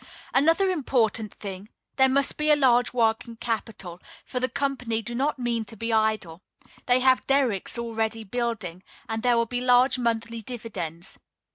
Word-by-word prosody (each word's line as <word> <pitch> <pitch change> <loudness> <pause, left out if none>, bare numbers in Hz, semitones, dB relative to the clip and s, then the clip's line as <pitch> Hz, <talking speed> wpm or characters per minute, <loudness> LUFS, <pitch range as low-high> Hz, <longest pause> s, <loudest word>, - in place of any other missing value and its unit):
Another 330 +7 +3
important 230 - 0
thing: 195 0 -8 0.3
there 265 -1 +6
must 275 +1 +2
be 300 0 0
a 300 - +7
large 245 -4 +3
working 230 0 0
capital, 220 -6 -4 0.2
for 250 - -3
the 255 +1 0
company 250 -5 -2
do 240 - -6
not 280 +5 0
mean 240 -2 -1
to 225 - -10
be 230 +2 -2
idle. 215 -6 0 0.5
They 250 +1 +4
have 260 0 +3
derricks 255 -7 +1
already 225 -1 -2
building; 215 -5 -3 0.3
and 225 0 -3
there 245 0 +3
will 230 - +2
be 245 +1 -3
large 250 +1 +4
monthly 230 -1 -1
dividends. 195 -7 -7
235 Hz, 160 wpm, -26 LUFS, 220-255 Hz, 0.5 s, a